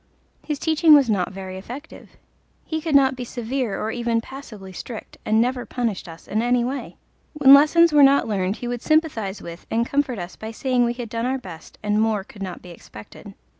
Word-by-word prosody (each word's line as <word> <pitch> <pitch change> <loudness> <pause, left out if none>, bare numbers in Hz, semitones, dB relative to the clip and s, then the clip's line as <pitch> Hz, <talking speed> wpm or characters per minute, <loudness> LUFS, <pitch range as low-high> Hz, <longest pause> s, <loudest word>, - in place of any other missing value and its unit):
His 300 -2 -3
teaching 315 +1 +5
was 270 -6 +4
not 185 -4 0
very 190 -1 -7
effective. 260 +10 -11 0.5
He 315 -1 -3
could 310 -2 -1
not 265 -1 +5
be 250 - -5
severe 240 -2 -3
nor 220 - -2
even 235 -1 0
passably 225 -7 -10
strict, 225 +3 -9
and 220 +1 +3
never 245 +1 0
punished 230 -8 -3
us 165 0 -12
in 215 - 0
any 245 0 +2
way. 265 +3 -4 0.4
When 280 -3 +7
lessons 310 +3 +6
were 295 - +6
not 275 -1 +5
learned 195 -2 -1
he 240 - -6
would 240 -1 -3
sympathize 280 -11 0
with 170 +1 -10
and 230 +1 +1
comfort 275 -2 -1
us 175 -1 -7
by 220 - -7
saying 245 +2 0
we 235 - 0
had 240 -1 -6
done 230 +2 -2
our 265 +1 0
best 180 -9 -11
and 210 0 +1
more 220 -3 +1
could 210 -1 -15
not 185 -2 -6
be 180 - -11
expected. 105 -10 -13
240 Hz, 205 wpm, -22 LUFS, 205-275 Hz, 0.5 s, When